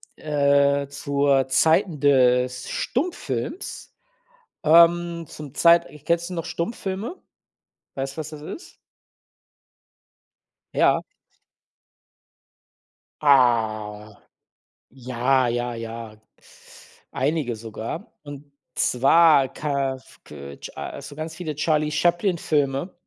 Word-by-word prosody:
äh, 140 -1 +2
zur 140 -1 +1
Zeiten 160 +3 +2
des 125 -2 +2
Stummfilms, 285 - -4 0.7
ähm, 170 +1 +4
zum 150 -3 -10
Zeit 170 +1 +5
ich 150 -1 -16
kennst 170 +1 0
du - - -6
noch 170 -1 -4
Stummfilme? 195 - -4 0.7
Weißt 135 +1 -4
du, - - -12
was 155 0 -6
das 150 -1 -10
ist? 320 - -10 2.0
Ja. - - +3 2.2
Ah. 110 -6 +2 0.8
Ja, 125 0 0
ja, 120 0 -2
ja. 115 -1 -8 0.9
Einige 135 -3 -1
sogar. 115 - -7
Und 145 0 -11 0.2
zwar 140 +2 +4
kaf 140 -3 -3
ke 70 -1 -10
cha 70 - -7
so 145 +1 -10
ganz 155 +1 -6
viele 160 -5 -5
Charlie 150 0 0
Chaplin-Filme. 170 -3 0
140 Hz, 90 wpm, -23 LUFS, 125-165 Hz, 2.2 s, Zeit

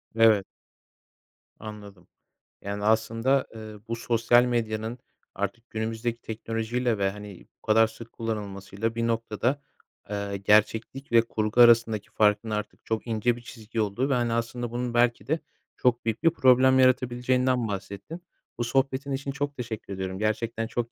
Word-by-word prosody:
Evet. 110 -3 +5 1.1
Anladım. 105 -4 -10 0.5
Yani, 100 +1 -4
aslında, 115 +5 +2
ııı, 110 -2 -9
bu 115 - -2
sosyal 120 +1 +3
medyanın 115 0 -2 0.4
artık 100 +5 -4
günümüzdeki 115 +1 -3
teknolojiyle 115 +1 -2
ve, 100 -1 +1
hani, 105 -2 -11
bu - - -74
kadar 110 +1 +5
sık 115 +1 -12
kullanılmasıyla 105 0 -4
bir 115 0 0
noktada, 115 +4 -1 0.5
ııı, 100 -1 -3
gerçeklik 110 +6 +1
ve 115 -1 +7
kurgu 110 +1 +1
arasındaki 115 -3 +5
farkın 105 +1 +2
artık 105 0 -4
çok 110 +1 -2
ince 115 +1 +1
bir 120 - -11
çizgi 115 -1 -5
olduğu 110 +7 -1
ve, - - +2
hani, 120 -2 +1
aslında 120 0 -2
bunun 120 0 -3
belki 120 0 +2
de 160 +3 +1 0.4
çok 120 -2 +1
büyük 115 +4 -2
bir 165 - +7
problem 130 -3 +5
yaratabileceğinden 125 -1 +2
bahsettin. 100 - -6 0.4
Bu 120 - -1
sohbetin 135 +2 0
için 140 +1 -2
çok 145 +1 -3
teşekkür 115 -4 -5
ediyorum. 95 0 -4
Gerçekten 110 +1 -1
çok 120 0 -3
115 Hz, 145 wpm, -26 LUFS, 110-120 Hz, 1.1 s, ve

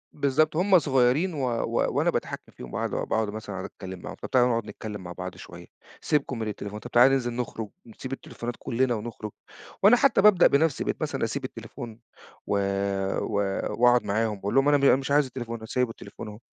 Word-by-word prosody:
بالضبط، 150 +2 +2
هُم 185 +1 +5
صغيرين 135 +5 +2
و 145 - -3 0.2
و - - 0
وأنا - - +3
باتحكم - - -4
فيهم 65 - -10
باقعد - - -2
باقعد 110 -1 -1
مثلًا 105 -3 -6
أتكلم 95 -2 -8
معاهم، - - -8
طب، - - -6
تعالوا 125 -1 +4
نقعد 115 -2 0
نتكلم 105 -3 -7
مع 90 - -7
بعض 90 +1 -6
شوية، - - -11 0.4
سيبكم 140 -4 0
من 110 - -2
التليفون، 105 0 -5
طب، 120 +3 -10
تعالوا 125 +3 +6
ننزل 120 -3 0
نخرج، 115 -3 -4 0.2
نسيب 130 +3 -8
التليفونات 120 -2 -6
كلنا 125 0 0
ونخرج، 110 -1 -6 0.5
وأنا 210 +5 +8
حتى 250 -5 +4
بابدأ 200 -4 +7
بنفسي. 145 0 +2
بقيت - - -3
مثلًا - - -2
أسيب - - -2
التليفون 115 -2 -8 0.5
و - - 0 0.7
و - - -3 0.5
وأقعد 125 0 +5
معاهم 110 +2 0
وأقول 100 +1 -3
لهم: 135 +1 +4
"أنا 145 - +5
م 140 - -3
أنا 140 - +7
مش 135 +1 -4
عايز 145 0 +4
التليفون، 120 -2 -6
أنا 110 - -10
سايب 125 +1 0
التليفون 115 - -9
اهو، 105 0 -9
120 Hz, 200 wpm, -26 LUFS, 110-140 Hz, 0.7 s, وأنا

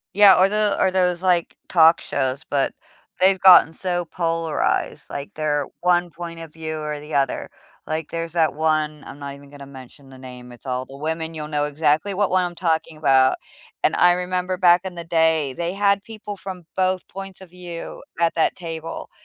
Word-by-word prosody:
Yeah, 200 -3 +7
or 190 - +5
the 210 -1 +1
or 190 - +3
those 180 -1 +1
like 180 -3 +1
talk 165 -1 +5
shows, 135 +3 -2
but 140 -2 0 0.5
they've 190 0 +4
gotten 180 -3 +7
so 175 -1 -2
polarized, 165 -1 -1
like, 140 0 -6
they're 150 -2 -1
1 175 0 +2
point 170 +1 -8
of 165 -2 -10
view 160 -1 -5
or 150 -1 -4
the 150 +1 -10
other, 140 -2 0 0.4
like 155 0 -4
there's 165 -1 -4
that 160 -4 +2
one, 155 -1 0
I'm 140 - -10
not 140 -1 -7
even 140 0 -16
gonna 140 -1 -11
mention 135 +1 -14
the 130 - -13
name, 125 -1 -11
it's 120 +2 -16
all 130 0 -2
the 135 +1 -12
women, 160 +2 -3
you'll 155 -1 -6
know 150 -1 0
exactly 155 +5 +1
what 205 -1 +1
one 185 -1 +3
I'm 175 - -6
talking 165 -2 -1
about, 135 -3 +4 0.5
and - - +3
I 175 0 +6
remember 180 +1 -2
back 175 -1 +5
in 185 -2 -6
the 170 - -6
day, 160 -4 +2
they 170 +4 -3
had 200 0 +2
people 215 -2 -8
from 185 -2 -8
both 185 -1 0
points 195 -1 -9
of 190 - -12
view 175 -2 -8 0.2
at 165 - +3
that 165 - +1
table, 165 -2 -7
165 Hz, 195 wpm, -22 LUFS, 150-180 Hz, 0.5 s, Yeah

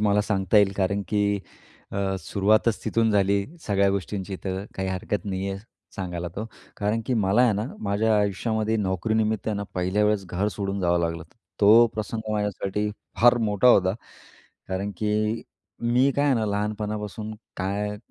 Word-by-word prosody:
मला 105 -1 +3
सांगता 100 -1 +1
येईल 100 -1 +4
कारण 100 +1 0
की 100 0 +1 0.5
अ, 95 -1 -1
सुरुवातच 105 +6 +1
तिथून 115 -1 +2
झाली 100 -1 +2 0.2
सगळ्या 100 -1 +3
गोष्टींची, 95 0 -3
तर 95 0 -3
काही 95 0 -2
हरकत 95 +1 -2
नाही 95 -1 -2
आहे 95 - -4 0.4
सांगायला 90 -2 -4
तो, 105 - -3 0.3
कारण 105 +2 0
की 130 - +1
मला 105 +1 +3
आहे 125 -3 +4
ना, 105 +2 -2
माझ्या 105 +2 +1
आयुष्यामध्ये 110 +2 0
नोकरीनिमित्तानं 105 +1 0
पहिल्या 95 +3 +1
वेळेस 105 -2 +1
घर 90 +4 -1
सोडून 100 -1 -2
जावं 85 -1 +2
लागलं 85 -1 -1
होतं. 80 +7 -14 0.2
तो 110 +3 +8
प्रसंग 110 0 -4
माझ्यासाठी 105 0 -1 0.3
फार 120 +1 +7
मोठा 105 +4 +4
होता, 95 -5 +5 0.7
कारण 95 +2 -2
की 105 +2 0 0.4
मी 125 +3 +3
काय 145 - +3
आहे 140 - +4
ना, 115 -2 0
लहानपणापासून 105 +1 -3 0.2
काय? 105 +2 -2
105 Hz, 155 wpm, -25 LUFS, 95-110 Hz, 0.7 s, तो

